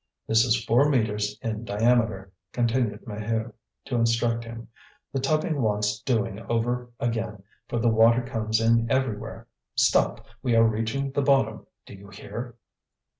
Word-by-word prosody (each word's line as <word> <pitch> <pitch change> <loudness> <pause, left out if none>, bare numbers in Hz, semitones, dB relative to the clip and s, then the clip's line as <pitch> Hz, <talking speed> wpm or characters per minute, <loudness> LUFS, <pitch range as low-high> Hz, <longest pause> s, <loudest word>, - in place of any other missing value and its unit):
"This 110 0 +4
is 120 -1 +1
four 135 +6 +4
metres 105 -6 0
in 110 0 -3
diameter," 110 -3 +1 0.2
continued 120 -3 0
Maheu, 110 +1 -3 0.3
to 130 - -3
instruct 115 0 +1
him. 115 0 -9 0.5
"The 135 - 0
tubbing 155 +2 0
wants 105 -1 0
doing 115 -4 -1
over 120 +1 -1
again, 115 -3 -2 0.2
for - - -3
the 120 +1 +1
water 115 +2 +5
comes 110 -3 -1
in 115 0 +3
everywhere. 130 -6 -2 0.3
Stop! - - +2 0.2
we 120 -3 +1
are 115 - +6
reaching 115 +5 -1
the 140 - 0
bottom: 135 -1 +1 0.2
do - - -12
you 100 0 -12
hear?" 115 +5 -7
115 Hz, 145 wpm, -26 LUFS, 110-125 Hz, 0.5 s, are